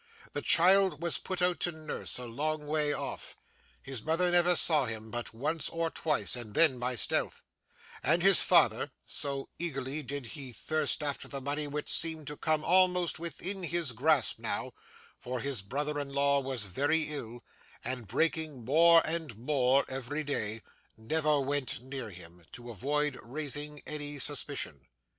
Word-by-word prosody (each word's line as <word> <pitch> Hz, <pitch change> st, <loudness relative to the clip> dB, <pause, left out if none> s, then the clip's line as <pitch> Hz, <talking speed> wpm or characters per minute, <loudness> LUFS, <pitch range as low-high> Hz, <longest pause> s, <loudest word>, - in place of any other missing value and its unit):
The -, -, -4 dB
child 185 Hz, -2 st, +5 dB
was 170 Hz, -, +1 dB
put 185 Hz, -1 st, -3 dB
out 180 Hz, -1 st, +2 dB
to 175 Hz, -, 0 dB
nurse, 155 Hz, -2 st, -5 dB
a 125 Hz, -, -6 dB
long 150 Hz, +6 st, -2 dB
way 150 Hz, 0 st, +1 dB
off; -, -, -4 dB, 0.5 s
his 130 Hz, -4 st, -5 dB
mother 165 Hz, +5 st, +1 dB
never 175 Hz, 0 st, +3 dB
saw 155 Hz, -5 st, +6 dB
him 110 Hz, -1 st, -7 dB
but 120 Hz, 0 st, -5 dB
once 150 Hz, +8 st, -2 dB
or 165 Hz, -1 st, -3 dB
twice, 150 Hz, -5 st, 0 dB
and 115 Hz, -4 st, -8 dB
then 150 Hz, -7 st, +5 dB
by 125 Hz, +1 st, -2 dB
stealth; 115 Hz, -, 0 dB, 0.6 s
and 175 Hz, -, +2 dB
his 195 Hz, -1 st, +7 dB
father -, -, +3 dB, 0.2 s
so 140 Hz, -1 st, -4 dB
eagerly 140 Hz, -3 st, -3 dB
did 140 Hz, -1 st, -6 dB
he 135 Hz, -5 st, -2 dB
thirst 155 Hz, +4 st, 0 dB
after 145 Hz, -1 st, -3 dB
the 140 Hz, -, -5 dB
money 145 Hz, +2 st, -2 dB
which 150 Hz, +1 st, -4 dB
seemed 160 Hz, -2 st, +3 dB
to 150 Hz, -, -6 dB
come 155 Hz, -1 st, 0 dB
almost 180 Hz, -1 st, +2 dB
within 180 Hz, +3 st, -3 dB
his 170 Hz, -5 st, 0 dB
grasp 135 Hz, +2 st, +2 dB
now, -, -, -3 dB, 0.5 s
for 125 Hz, 0 st, -5 dB
his 135 Hz, -3 st, -2 dB
brother 145 Hz, +8 st, -3 dB
in 140 Hz, -1 st, -5 dB
law 140 Hz, 0 st, +2 dB
was 130 Hz, -5 st, -2 dB
very 145 Hz, -, +2 dB
ill, 120 Hz, -6 st, -4 dB, 0.4 s
and 125 Hz, -4 st, -4 dB
breaking 155 Hz, +1 st, -1 dB
more 165 Hz, +5 st, +5 dB
and 155 Hz, -8 st, -4 dB
more 130 Hz, +1 st, +1 dB
every 135 Hz, +3 st, -4 dB
day 110 Hz, -6 st, -4 dB, 0.3 s
never 150 Hz, +6 st, 0 dB
went 140 Hz, -1 st, -1 dB
near 130 Hz, -3 st, -6 dB
him, 90 Hz, -2 st, -12 dB
to 120 Hz, 0 st, -9 dB
avoid 145 Hz, +5 st, -2 dB
raising 145 Hz, +3 st, -4 dB
any 145 Hz, -1 st, -3 dB
suspicion. 70 Hz, -, -2 dB
145 Hz, 160 wpm, -30 LUFS, 125-160 Hz, 0.6 s, his